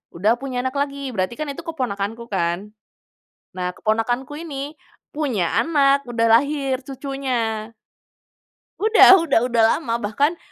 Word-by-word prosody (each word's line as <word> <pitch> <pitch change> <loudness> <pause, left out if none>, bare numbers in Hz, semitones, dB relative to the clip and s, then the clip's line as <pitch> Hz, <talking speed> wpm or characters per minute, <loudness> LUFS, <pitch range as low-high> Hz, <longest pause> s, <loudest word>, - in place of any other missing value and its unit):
udah 200 +6 +2
punya 270 -2 -5
anak 260 +2 -3
lagi, 280 0 -3 0.2
berarti 185 +2 -1
kan 305 - -3
itu 280 - -8
keponakanku 235 -7 -3
kan. 170 -1 0 1.0
Nah 180 -1 -2
keponakanku 240 +5 -1
ini 325 -4 -8 0.6
punya 280 -10 -1 0.2
anak, 280 -4 +3
udah 230 -1 +1
lahir 275 +1 +1
cucunya. 250 -5 -3 1.0
Udah 430 -2 +7
udah 275 -7 +3
udah 235 -1 +3
lama 240 -8 -3
bahkan 280 +10 0
255 Hz, 125 wpm, -21 LUFS, 220-285 Hz, 1.0 s, Udah